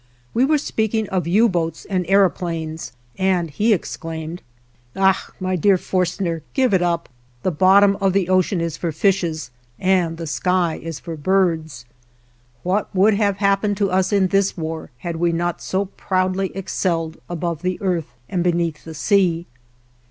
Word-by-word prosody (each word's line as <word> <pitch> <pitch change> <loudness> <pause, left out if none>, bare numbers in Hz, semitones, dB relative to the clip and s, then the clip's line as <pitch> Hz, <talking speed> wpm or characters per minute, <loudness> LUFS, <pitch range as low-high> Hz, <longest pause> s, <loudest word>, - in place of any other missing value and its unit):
We 245 +3 +3
were 305 +2 +3
speaking 220 -5 -1
of 185 -3 -1
U 210 +7 +4
boats 165 -5 -2
and 185 -3 -1
aëroplanes, 170 -4 0 0.3
and 185 -4 +1
he 215 +10 +1
exclaimed: 165 -3 -3 0.5
"Ach! 190 0 +2
my 185 0 -1
dear 190 +3 +4
Forstner, 180 -2 -1
give 260 -5 +3
it 185 - +4
up! 170 -1 0 0.4
The 185 - +1
bottom 195 +4 +5
of 195 -1 +3
the 195 -3 +1
ocean 185 -1 +2
is 165 -2 -3
for 170 - -2
fishes, 160 -5 0 0.3
and 180 -3 +2
the 165 - -5
sky 175 +2 0
is 165 -2 -6
for 170 -2 -6
birds." 160 -5 0 0.8
What 190 +3 0
would 200 +4 +5
have 200 -1 +1
happened 200 0 +1
to 200 -2 +1
us 185 +2 +1
in 195 -2 +3
this 195 0 +1
war 160 -1 -4
had 165 +6 -5
we 170 +1 +2
not 175 +1 -2
so 195 +2 -1
proudly 185 0 -1
excelled 170 -4 -2
above 170 -2 -3
the 185 0 -2
earth 180 -5 -1 0.2
and 180 0 -1
beneath 170 -3 0
the 160 -1 -9
sea? 175 -1 +2
185 Hz, 160 wpm, -21 LUFS, 165-195 Hz, 0.8 s, bottom